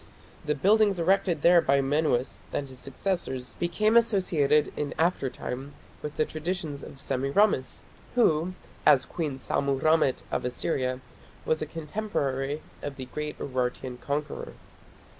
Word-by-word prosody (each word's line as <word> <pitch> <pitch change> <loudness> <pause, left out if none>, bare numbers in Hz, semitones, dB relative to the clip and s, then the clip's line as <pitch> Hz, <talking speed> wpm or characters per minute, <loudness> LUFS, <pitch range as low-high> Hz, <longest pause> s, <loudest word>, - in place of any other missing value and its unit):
The 150 0 0
buildings 205 +4 +4
erected 175 -2 +2
there 170 0 +7
by 140 -2 +3
Menuas 135 -2 +1
and 140 - -2
his 130 -1 -12
successors 130 -4 -3
became 215 +6 +2
associated 180 -10 +3
in 150 -1 -3
after 165 -5 +1
time 135 +2 -6 0.3
with 150 0 -5
the 155 - +2
traditions 155 -2 -4
of 135 - -10
Semiramis, 135 +4 +1 0.3
who, 180 -6 +3 0.3
as 145 -4 +6
Queen 150 -6 -3
Sammu 135 0 0
rammat 155 -4 +3
of - - -1
Assyria, 130 0 -1 0.4
was 160 - +1
a 155 - -2
contemporary 150 -4 -2 0.2
of 145 -1 -5
the 130 -2 -6
great 150 +3 -5
Urartian 125 -1 -3
conqueror. 145 +1 -3
150 Hz, 135 wpm, -27 LUFS, 135-170 Hz, 0.4 s, there